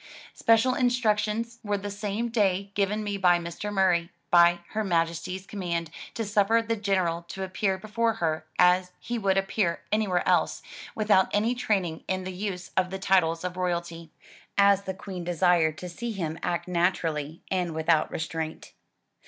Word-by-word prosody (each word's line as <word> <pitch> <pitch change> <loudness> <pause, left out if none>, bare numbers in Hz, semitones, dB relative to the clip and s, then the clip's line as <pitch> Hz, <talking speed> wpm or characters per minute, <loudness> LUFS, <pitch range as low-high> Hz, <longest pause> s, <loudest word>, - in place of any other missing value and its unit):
Special 230 +3 +3
in 250 - +2
structions 230 -1 0
were 205 -1 0
the 205 +1 -5
same 205 +3 -3
day 200 -3 +1
given 205 +2 0
me 205 -1 -2
by 180 -2 +4
Mr. 170 +4 -5
Murray, 180 -4 +2 0.2
by 175 0 +6
Her 220 0 -2
Majesty's 170 +1 -1
command, 170 -5 -3 0.2
to 225 - -2
suffer 210 +2 +3
the 230 0 -1
General 190 -5 0
to 190 +2 -5
appear 190 +1 -1
before 225 +2 0
her 160 -6 -2
as 180 0 +4
he 240 -1 -3
would 195 -2 +1
appear 195 -2 0
anywhere 205 -5 +1
else, - - +2 0.3
without 210 -3 +3
any 220 +4 +2
training 195 -9 -1
in 185 0 -1
the 185 0 -5
use 180 -1 -5
of 185 -1 +2
the 190 - -4
titles 180 -4 +2
of 180 0 -4
royalty, 170 -2 -3 0.5
as 200 0 +5
the 190 - -4
Queen 185 -2 -7
desired 170 -2 +2
to 180 - -6
see 230 +7 -5
him 165 -6 -4
act 175 0 -2
naturally 170 -4 -1
and 180 -4 -1
without 160 0 +2
restraint. 160 0 -5
190 Hz, 165 wpm, -27 LUFS, 170-210 Hz, 0.5 s, by